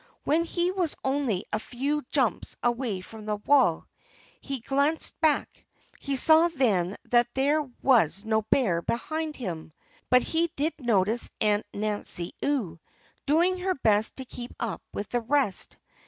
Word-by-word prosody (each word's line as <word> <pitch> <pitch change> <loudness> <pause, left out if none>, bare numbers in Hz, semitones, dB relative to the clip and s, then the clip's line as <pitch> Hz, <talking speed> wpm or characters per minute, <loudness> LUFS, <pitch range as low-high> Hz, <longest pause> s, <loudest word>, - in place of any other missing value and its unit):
When 325 +3 +2
he 345 +1 0
was 365 -5 -1
only 265 -8 0
a 215 - +1
few 275 +6 -2
jumps 255 -10 0
away 240 -5 -1
from 215 +3 -11
the 210 - 0
wall 270 +7 +3 0.5
he 275 -2 -5
glanced 280 +8 +1
back. 310 -2 +1 0.4
He 280 -1 -2
saw 315 +5 +6
then 210 - +1 0.2
that 240 0 +5
there 285 +3 +2 0.2
was 215 - +3
no 220 0 +2
bear 210 -6 +1
behind 310 - -3
him. 165 -9 -6 0.4
But 250 +1 +5
he 335 +1 0
did 305 +4 0
notice 225 -2 +1
Aunt 210 -1 +2
Nancy 205 -4 -2
Ewe, 220 - -1 0.5
doing 345 +5 +3
her 370 +1 -1
best 215 -4 +2
to 265 - -6
keep 245 0 -8
up 230 -3 -3
with 205 - -5
the 245 - -1
rest. 255 -4 0
250 Hz, 150 wpm, -27 LUFS, 210-295 Hz, 0.5 s, saw